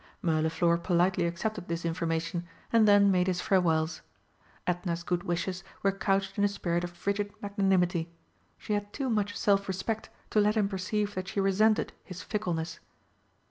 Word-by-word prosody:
Mirliflor 165 Hz, +1 st, +2 dB
politely 180 Hz, 0 st, +2 dB
accepted 185 Hz, +2 st, -3 dB
this 170 Hz, 0 st, -3 dB
information, 170 Hz, +1 st, -2 dB, 0.3 s
and 225 Hz, -2 st, +6 dB
then 205 Hz, -1 st, +6 dB
made 180 Hz, -1 st, +2 dB
his 180 Hz, -1 st, 0 dB
farewells. 165 Hz, -4 st, +1 dB, 0.6 s
Edna's 175 Hz, -1 st, -1 dB
good 175 Hz, 0 st, -1 dB
wishes 180 Hz, +2 st, -2 dB, 0.2 s
were 195 Hz, -, +4 dB
couched 195 Hz, -1 st, 0 dB
in -, -, +3 dB
a -, -, +6 dB
spirit 175 Hz, -4 st, -1 dB
of 175 Hz, -, -3 dB
frigid 200 Hz, +3 st, -2 dB
magnanimity. 190 Hz, -4 st, +1 dB, 0.5 s
She 210 Hz, -, -4 dB
had 205 Hz, 0 st, -2 dB
too 270 Hz, -3 st, -2 dB
much 205 Hz, -2 st, 0 dB
self 200 Hz, -1 st, +2 dB
respect 195 Hz, +4 st, -3 dB, 0.2 s
to 215 Hz, -, +4 dB
let 210 Hz, +2 st, +2 dB
him 205 Hz, -2 st, +3 dB
perceive 205 Hz, +2 st, -2 dB
that 185 Hz, -1 st, -4 dB
she 200 Hz, -, -2 dB
resented 205 Hz, +3 st, +3 dB
his 185 Hz, -2 st, -8 dB
fickleness. 175 Hz, -6 st, -3 dB
190 Hz, 160 wpm, -29 LUFS, 175-205 Hz, 0.6 s, and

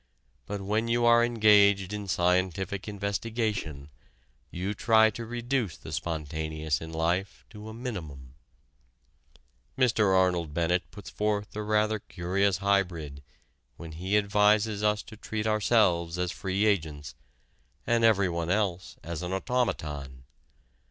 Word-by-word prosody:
But 100 Hz, -1 st, -4 dB
when 105 Hz, +4 st, -1 dB
you 120 Hz, +1 st, +1 dB
are 120 Hz, 0 st, +6 dB
engaged 105 Hz, -4 st, +4 dB
in 105 Hz, -1 st, -5 dB
scientific 90 Hz, +2 st, 0 dB
investigation, 100 Hz, -7 st, -3 dB, 0.6 s
you 95 Hz, +4 st, -3 dB
try 110 Hz, +1 st, +4 dB
to 115 Hz, +2 st, -7 dB
reduce 120 Hz, -, -2 dB
the -, -, -10 dB
spontaneous 80 Hz, -2 st, -3 dB
in 80 Hz, 0 st, -7 dB
life 85 Hz, +4 st, -2 dB
to 105 Hz, 0 st, -9 dB
a -, -, -8 dB
minimum. 80 Hz, -, -7 dB, 1.4 s
Mr. 110 Hz, -6 st, +3 dB
Arnold 90 Hz, -5 st, +1 dB
Bennett 90 Hz, +2 st, 0 dB
puts 105 Hz, -, -11 dB
forth 105 Hz, -1 st, -2 dB
a 105 Hz, -, -3 dB
rather 105 Hz, 0 st, +1 dB
curious 95 Hz, +1 st, -1 dB
hybrid 90 Hz, -8 st, -1 dB, 0.6 s
when 80 Hz, -1 st, -9 dB
he 95 Hz, +6 st, 0 dB
advises 105 Hz, +1 st, +2 dB
us 105 Hz, 0 st, +1 dB
to 110 Hz, -, -12 dB
treat 110 Hz, 0 st, -4 dB
ourselves 100 Hz, -6 st, +2 dB
as 90 Hz, 0 st, -1 dB
free 95 Hz, +2 st, -1 dB
agents 80 Hz, -, -1 dB, 0.7 s
and 115 Hz, -1 st, +2 dB
everyone 90 Hz, -7 st, +2 dB
else 95 Hz, -2 st, -1 dB
as 85 Hz, -1 st, -5 dB
an 90 Hz, 0 st, -4 dB
automaton. 75 Hz, -, -2 dB
100 Hz, 125 wpm, -28 LUFS, 85-110 Hz, 1.4 s, are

